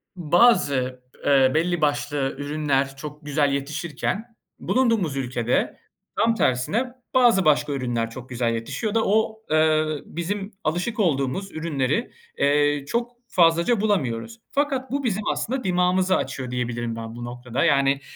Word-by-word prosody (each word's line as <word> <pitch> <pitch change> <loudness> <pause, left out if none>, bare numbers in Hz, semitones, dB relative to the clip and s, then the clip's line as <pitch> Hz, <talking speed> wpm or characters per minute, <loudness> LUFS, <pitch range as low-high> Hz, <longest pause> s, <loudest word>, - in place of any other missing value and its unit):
bazı, 150 - +3 0.2
eee, 135 -2 +5
belli 175 0 +1
başlı 145 -2 0
ürünler 145 -2 -1
çok 150 +1 -9
güzel 145 -1 +1
yetişirken 160 - -3 0.2
bulunduğumuz 225 - +1
ülkede 125 -2 -1 0.4
tam 230 0 +3
tersine 215 - 0 0.2
bazı 235 -8 +4
başka 150 -1 +3
ürünler 120 -4 -1
çok 130 +2 -10
güzel 120 -2 0
yetişiyor 205 - -3
da 225 - +2
o, 220 +1 +1
eee, 155 0 +4 0.2
bizim 195 +5 -4
alışık 180 +9 -1
olduğumuz 165 +2 0
ürünleri, 155 - -1 0.3
eee, 145 0 +2
çok 235 +1 -1 0.2
fazlaca 170 +6 +3
bulamıyoruz 195 - -1
fakat 275 -2 -1
bu 280 0 -1
bizim 215 -3 -1
aslında 255 +1 -3
dimağımızı 185 0 +2
açıyor 130 -1 -4
diyebilirim 120 -2 -2
ben 115 0 -7
bu 120 0 -6
noktada, 125 +3 -3
yani, 140 -3 +3
150 Hz, 130 wpm, -24 LUFS, 130-200 Hz, 0.4 s, eee